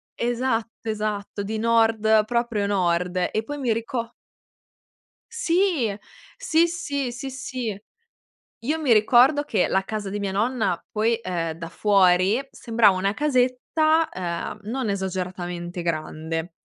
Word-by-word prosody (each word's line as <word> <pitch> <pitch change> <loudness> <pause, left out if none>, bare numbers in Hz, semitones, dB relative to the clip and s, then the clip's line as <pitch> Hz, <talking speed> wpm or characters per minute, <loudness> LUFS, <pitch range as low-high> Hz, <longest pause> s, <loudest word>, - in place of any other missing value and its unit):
Esatto, 235 -2 -2
esatto. 210 -1 -3
Di 215 +2 -3
Nord, 225 -1 +3
proprio 235 -3 0
Nord 180 -2 +1
e 220 - -1
poi 290 +4 -6
mi 250 -5 0
rico 230 +1 -4 1.2
Sì! 350 - +1 0.4
Sì, 330 +2 +3
sì, 285 -6 -3
sì, 245 +3 -6
sì. 255 -6 -5 0.8
Io 310 +5 0
mi 265 -7 +3
ricordo 250 +7 +5
che 210 -9 +1
la 190 - +1
casa 210 -1 -4
di 205 - -3
mia 200 -1 -2
nonna, 210 -3 0
poi, 225 +2 +2
ehm, 170 -4 -2
da 165 0 -8
fuori 190 +2 +3
sembrava 225 -4 +3
una 195 +2 0
casetta, 300 +4 +2
ehm, 175 +3 -4
non 235 +1 -2
esageratamente 180 -2 -4
grande, 160 0 -3
220 Hz, 125 wpm, -24 LUFS, 190-250 Hz, 1.2 s, ricordo